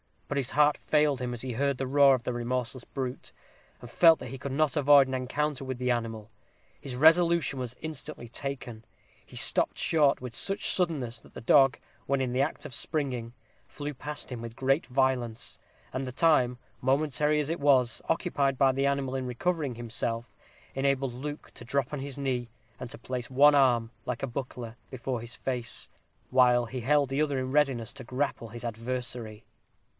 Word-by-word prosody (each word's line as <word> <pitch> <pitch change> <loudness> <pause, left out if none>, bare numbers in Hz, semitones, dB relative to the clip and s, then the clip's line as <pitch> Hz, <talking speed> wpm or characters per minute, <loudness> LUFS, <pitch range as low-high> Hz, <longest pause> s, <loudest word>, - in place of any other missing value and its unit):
But 145 - -3
his 135 -2 0
heart 150 0 +4
failed 150 -3 +2
him 125 -1 -2
as 120 - -5
he 130 - -4
heard 140 +2 0
the 135 - -2
roar 140 0 +6
of 125 - -6
the 125 - -2
remorseless 120 +1 -3
brute, 130 -2 -5 0.5
and 120 - -10
felt 165 +4 +6
that - - -7
he 135 - -6
could 130 +1 -5
not 155 -1 +1
avoid 145 -1 +6
an 130 - -5
encounter 135 +2 -2
with 130 -1 -4
the 125 0 0
animal. 115 -2 -3 0.5
His 135 -3 -6
resolution 165 0 +4
was 125 -1 -5
instantly 150 -5 -6
taken: 125 -3 -6 0.4
he - - -16
stopped - - +2
short 150 -5 +3
with 125 -2 -6
such 195 +9 +2
suddenness, 140 -10 0
that - - -19
the - - -7
dog, 135 +3 +5 0.3
when 140 0 +1
in 130 -2 -1
the 130 +2 +1
act 145 - -2
of - - -7
springing, 125 -7 -2 0.3
flew 150 0 -6
past 145 +1 -6
him 120 -2 -5
with 115 -1 -7
great 135 +5 +1
violence, 125 -3 -1 0.3
and 130 +1 -3
the 125 - -6
time, 130 -5 +3 0.2
momentary 150 +3 +1
as 150 0 -1
it 170 - -2
was, 135 -4 +3
occupied 140 -5 +1
by 135 0 +5
the 135 +1 0
animal 140 -2 -1
in 130 -1 -2
recovering 145 +1 -1
himself, 115 0 -3 0.4
enabled 135 -1 0
Luke 145 +4 -7
to 120 - -11
drop 135 +2 -1
on 145 - -2
his 140 0 -6
knee, 125 -4 -2 0.3
and 125 - -6
to - - -9
place 125 0 -5
one 145 +3 +6
arm, 120 -5 +3
like 125 +1 -3
a - - 0
buckler, 120 -2 -6
before 125 -1 -4
his 120 0 -8
face, 125 -3 -3 0.4
while 125 -2 +5
he 130 +3 -5
held 140 +3 +2
the 135 +2 0
other 145 -3 0
in 130 0 -2
readiness 135 -5 +1
to 130 - -9
grapple 130 -2 -2
his 120 +2 -8
adversary. 120 -1 -4
130 Hz, 190 wpm, -28 LUFS, 120-145 Hz, 0.5 s, roar